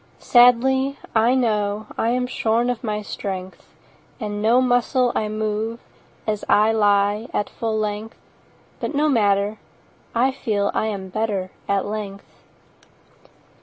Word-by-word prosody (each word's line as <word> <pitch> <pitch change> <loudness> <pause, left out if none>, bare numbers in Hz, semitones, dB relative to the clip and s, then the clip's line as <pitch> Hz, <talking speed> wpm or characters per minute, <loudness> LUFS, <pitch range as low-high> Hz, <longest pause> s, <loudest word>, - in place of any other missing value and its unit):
Sadly, 265 +3 +4 0.2
I 230 +3 +4
know 215 -4 0
I 225 - 0
am 250 +1 +1
shorn 235 0 0
of 245 - -6
my 210 -2 -2
strength, 190 -2 -6 0.5
And 210 -2 -4
no 230 +3 +4
muscle 250 0 +2
I 215 - -1
move 215 +2 -2 0.5
As 210 -1 -2
I 215 +1 +5
lie 205 0 +2
at 205 - -1
full 225 -1 -2
length: 215 +1 -3 0.6
10 - - -3
But - - -2
no 300 +1 +3
matter—I 215 +2 -1
feel 215 -7 -1
I 220 - 0
am 195 -3 -4
better 200 -2 -2 0.2
at 200 -1 +1
length. 205 -1 -5
220 Hz, 130 wpm, -22 LUFS, 205-240 Hz, 0.6 s, I